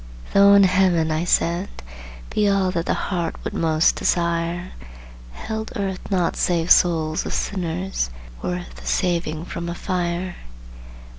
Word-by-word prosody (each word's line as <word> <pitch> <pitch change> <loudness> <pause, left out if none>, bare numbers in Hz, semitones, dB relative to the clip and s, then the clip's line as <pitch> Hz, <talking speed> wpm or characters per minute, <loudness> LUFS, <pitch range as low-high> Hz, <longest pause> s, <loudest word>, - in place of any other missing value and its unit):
"Though 200 0 +7
in 200 - +7
Heaven," 180 -4 +3
I 155 +2 0
said, 175 +2 +1 0.6
"be 210 -1 +2
all 195 -2 +2
That 170 -2 -2
the - - +1
heart 175 -4 -2
would - - -4
most 160 0 +2
desire, 170 +1 0 0.6
Held 220 - -5
Earth 195 -4 -2
naught 180 -4 +1
save 170 -1 0
souls 160 -3 +3
of - - -4
sinners 180 - -2 0.3
Worth 180 0 -4
the - - -11
saving 170 -3 -1
from 170 -1 -5
a 170 - -4
fire? 175 0 -2
175 Hz, 140 wpm, -22 LUFS, 170-190 Hz, 0.6 s, Though